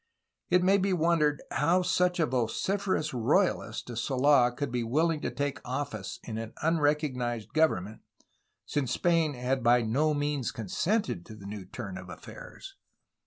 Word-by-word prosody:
It 180 0 +4
may 195 +2 +4
be 195 0 +1
wondered 160 -4 +2
how 170 +6 +2
such 180 0 +1
a 165 - +4
vociferous 155 - -1
royalist 125 - +1
as 115 -1 -3
Sold 130 -1 +3
could 145 -3 -2
be 125 -1 -1
wilhng 155 +7 +1
to - - -1
take 145 -1 -3
office 125 -6 -4
in 110 -1 -5
an 115 0 -6
unrecog 150 -3 +2
nized 120 -1 -3
government, 110 - +1 0.6
since 135 -4 -1
Spain 165 -2 +2
had 125 +2 -1
by 120 +1 +4
no 145 +8 +1
means 145 -4 -1
consented 145 - -1
to 110 - -10
the 100 -2 -12
new 100 -1 -7
turn 95 -2 -7
of 90 -1 -11
affairs. 90 - -10
140 Hz, 160 wpm, -29 LUFS, 115-160 Hz, 0.6 s, It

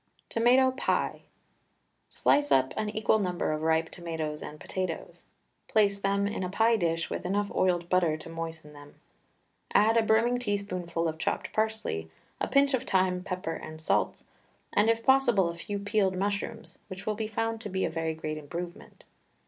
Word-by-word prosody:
TOMATO 255 +3 +4
PIE. 260 - -1 0.9
Slice 290 0 +2
up 130 0 +4
an 215 - -1
equal 220 +1 +2
number 180 -5 -1
of 155 0 -2
ripe 160 0 +1
tomatoes 160 -3 -4
and 150 - -8
potatoes. 185 +1 -5 0.4
Place 200 -2 +3
them 200 0 +1
in 200 -2 -2
a 180 - -2
pie 225 +4 +3
dish 165 -5 -1
with - - -3
enough 200 +3 -1
oiled 175 -2 +1
butter 175 -4 +2
to - - -11
moisten 165 -2 -6
them. 145 0 -14 0.8
Add 220 +2 +5
a - - +6
brimming 225 +3 +3
teaspoonful 185 -7 -2
of 160 0 -4
chopped - - -2
parsley, 220 - -1 0.3
a - - 0
pinch 275 +1 +3
of 255 - +2
thyme, 185 -1 +2
pepper, 185 -3 -3
and 155 -1 -8
salts 160 - 0 0.5
and, 210 +2 +4
if 230 0 +1
possible, 240 -9 +4
a 170 - -5
few 200 +4 -4
peeled 200 -2 +1
mushrooms, 205 +4 -3
which 190 -2 -8
will 215 - 0
be 215 +1 -3
found 225 +1 -2
to 210 - -5
be 190 0 0
a - - -1
very 160 0 -2
great 155 -1 -4
improvement. 170 +4 -8
190 Hz, 175 wpm, -29 LUFS, 165-220 Hz, 0.9 s, a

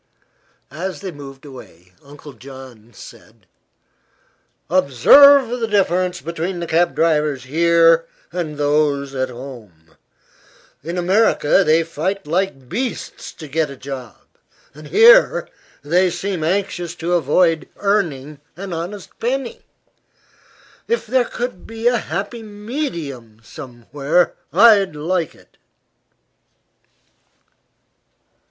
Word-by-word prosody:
As 170 +2 -5
they 190 - -5
moved 140 -2 -12
away 90 - -14
Uncle 145 +1 -13
John 130 -4 -13
said: 115 -3 -15 1.2
"Observe 245 - +6
the 225 - -1
difference 185 -3 0
between 170 +2 -4
the 170 - -3
cab 170 +2 +1
drivers 150 -5 +1
here 165 +3 +3 0.2
and 165 -4 -4
those 145 -1 0
at 130 -1 -2
home. 120 - -12 0.9
In 170 +4 -5
America 190 -1 +3
they 160 0 +3
fight 180 +5 -3
like 155 -5 -2
beasts 250 - -5
to 155 - -10
get 155 +1 -1
a 140 - -8
job; 130 -5 -8 0.6
here 455 - +5 0.4
they 180 +5 +2
seem 175 -1 -3
anxious 175 -1 -2
to 170 +1 -3
avoid 165 +1 +2
earning 155 -9 -1 0.2
an 190 -1 -6
honest 180 +4 -6
penny. 255 +1 -3 1.2
If 470 - -1
there 250 +2 +1
could 240 -8 -6
be 225 0 -8
a 240 -1 +3
happy 200 +8 -5
medium 205 - -6
somewhere, 140 +6 -2 0.2
I'd 205 -7 +5
like 165 +1 -2
it." - - -24
165 Hz, 105 wpm, -19 LUFS, 140-195 Hz, 1.2 s, Observe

